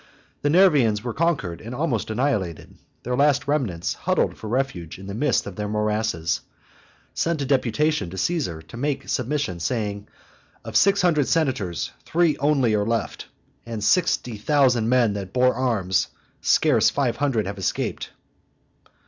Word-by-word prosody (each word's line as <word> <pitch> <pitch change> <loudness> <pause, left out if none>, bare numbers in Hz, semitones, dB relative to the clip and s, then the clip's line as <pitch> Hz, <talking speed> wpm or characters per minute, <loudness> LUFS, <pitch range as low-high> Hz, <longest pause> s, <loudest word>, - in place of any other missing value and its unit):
The 145 - +1
Nervians 145 - +4
were 120 -2 -3
conquered 145 - -1
and 115 +3 -7
almost 130 -8 -1
annihilated. 110 - -2 0.3
Their 125 +1 -1
last 145 +1 +2
remnants, 120 - -1
huddled - - 0
for 110 - -9
refuge 110 -10 -2
in 95 - -11
the 100 - -6
midst 125 +4 +1
of 100 -3 -8
their 105 0 -2
morasses, 105 -5 -1 0.7
sent 165 -4 -1
a - - -2
deputation 140 - +1
to 95 - -8
Caesar, 95 - -1
to 80 +9 -11
make 140 +2 -2
submission, 130 - -1
saying, 105 +1 -2 0.6
"Of 115 -1 -7
six 200 +9 +4
hundred 155 -6 +3
senators 125 - 0
three 170 -2 +2
only 140 -5 +2
are 105 -1 +2
left, 115 +2 -2 0.4
and 115 0 -6
of 105 - -4
sixty 120 - +1
thousand 125 -2 +2
men 120 -4 +3
that 100 -2 -6
bore 125 0 +3
arms 110 -8 0 0.3
scarce - - +4
five 130 -5 -1
hundred 135 -7 0
have 100 +1 -5
escaped." 95 - -2
120 Hz, 155 wpm, -23 LUFS, 105-145 Hz, 0.7 s, Nervians